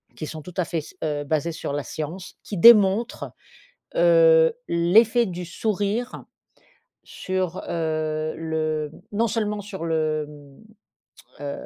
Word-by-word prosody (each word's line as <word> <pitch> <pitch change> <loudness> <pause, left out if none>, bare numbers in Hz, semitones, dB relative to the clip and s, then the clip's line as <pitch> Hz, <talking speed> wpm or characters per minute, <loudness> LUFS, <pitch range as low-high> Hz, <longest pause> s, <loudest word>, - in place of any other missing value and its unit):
qui 155 - -6
sont 155 +1 -7
tout 180 +4 -11
à 180 - +1
fait 165 - -2
s 150 - -11
heu, 150 -2 -2
basées 155 +3 -1
sur 155 - -5
la 145 0 -2
science, 160 +7 -7
qui 205 - -6
démontrent, 210 +2 +5 0.6
heu, - - +5
l'effet 220 +8 +4
du 180 -3 -5
sourire 210 +6 -2 0.8
sur, 185 -1 -3
heu, 155 -1 -2
le, 155 -2 -2 0.2
non 225 +3 +1
seulement 210 -1 -2
sur 195 -4 -7
le, 155 -2 -1 1.1
hem 145 -1 -6
175 Hz, 130 wpm, -23 LUFS, 155-210 Hz, 1.1 s, démontrent